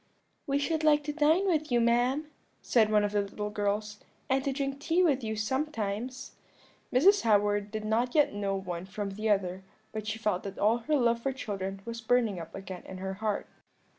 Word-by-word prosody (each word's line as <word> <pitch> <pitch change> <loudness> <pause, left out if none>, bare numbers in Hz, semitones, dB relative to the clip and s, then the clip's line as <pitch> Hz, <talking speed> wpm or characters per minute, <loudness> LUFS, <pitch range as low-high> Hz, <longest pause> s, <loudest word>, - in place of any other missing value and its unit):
"'We 280 0 +2
should 315 +2 -1
like 300 -1 +4
to 295 0 -3
dine 320 +5 +3
with 310 -6 0
you, 240 - +4
ma'am,' 245 +6 +2 0.3
said 220 -3 +3
one 210 -1 +4
of 205 - 0
the 205 0 +2
little 210 +1 -5
girls, 210 0 -2 0.3
'and 265 0 +2
to 275 - 0
drink 275 0 -3
tea 335 +5 +2
with 275 -7 +2
you 220 0 -2
sometimes.' 240 0 -2 0.6
"Mrs. 380 +11 +5
Howard 205 -2 +2
did 215 0 -5
not 235 +5 0
yet 295 -7 +4
know 200 -1 -1
one 180 -2 -5
from 200 +1 -4
the 215 +3 -2
other, 190 -2 +1 0.3
but 215 -1 -5
she 220 +1 -2
felt 210 -5 0
that 200 -1 -7
all 220 +3 +3
her 300 +6 -2
old 265 - +2
love 235 0 +2
for 270 - 0
children 195 -6 -5
was 230 0 -5
burning 225 -5 +2
up 165 - -9
again 190 -2 -7
in 190 - -7
her 190 +1 -4
heart. 215 -2 -1
220 Hz, 205 wpm, -29 LUFS, 205-270 Hz, 0.6 s, Mrs